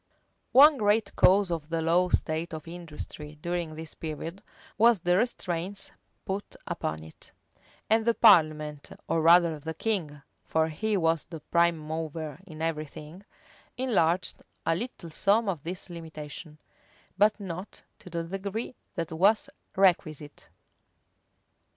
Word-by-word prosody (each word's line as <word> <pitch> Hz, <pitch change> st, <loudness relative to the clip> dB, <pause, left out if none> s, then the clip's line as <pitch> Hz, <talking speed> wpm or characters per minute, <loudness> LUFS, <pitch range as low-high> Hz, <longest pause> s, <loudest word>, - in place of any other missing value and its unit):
[*] -, -, -46 dB
One 285 Hz, +3 st, +8 dB
great 210 Hz, +1 st, +2 dB
cause 195 Hz, 0 st, +5 dB
of 160 Hz, -2 st, -3 dB
the 165 Hz, 0 st, -1 dB
low 170 Hz, +3 st, +2 dB
state 160 Hz, 0 st, -1 dB
of 155 Hz, -, -9 dB
industry 155 Hz, -3 st, -8 dB
during 170 Hz, -1 st, -3 dB
this 160 Hz, 0 st, -7 dB
period, 165 Hz, +4 st, -6 dB, 0.3 s
was 230 Hz, -3 st, +5 dB
the 175 Hz, +1 st, +2 dB
restraints 195 Hz, -3 st, -1 dB, 0.3 s
put 195 Hz, +1 st, -4 dB
upon 80 Hz, 0 st, -3 dB
it; 80 Hz, -, -13 dB, 0.6 s
and 220 Hz, +1 st, +3 dB
the 235 Hz, 0 st, +2 dB
parliament, 155 Hz, -8 st, +4 dB, 0.2 s
or 165 Hz, -, +1 dB
rather 165 Hz, -1 st, +5 dB
the 160 Hz, +2 st, -6 dB
king, 160 Hz, -9 st, -2 dB, 0.2 s
(for 160 Hz, 0 st, +1 dB
he 210 Hz, +7 st, -1 dB
was 165 Hz, -3 st, +1 dB
the 165 Hz, -1 st, -8 dB
prime 170 Hz, +2 st, +2 dB
mover 155 Hz, -1 st, -5 dB
in 155 Hz, -2 st, -7 dB
every 155 Hz, -2 st, -1 dB
thing,) 155 Hz, +7 st, -11 dB, 0.5 s
enlarged 185 Hz, -9 st, +1 dB, 0.2 s
a -, -, +3 dB
little 185 Hz, -5 st, -6 dB
some 210 Hz, +7 st, +2 dB
of 175 Hz, -7 st, -2 dB
these 180 Hz, +5 st, -6 dB
limitations; 160 Hz, -2 st, -8 dB, 0.6 s
but 210 Hz, +3 st, +3 dB
not 185 Hz, 0 st, -7 dB, 0.2 s
to 185 Hz, -, -12 dB
the 170 Hz, -1 st, -3 dB
degree 195 Hz, +7 st, -4 dB, 0.2 s
that 165 Hz, -3 st, -3 dB
was 195 Hz, +7 st, +3 dB, 0.2 s
requisite. 155 Hz, -6 st, +1 dB
170 Hz, 140 wpm, -28 LUFS, 155-195 Hz, 0.6 s, One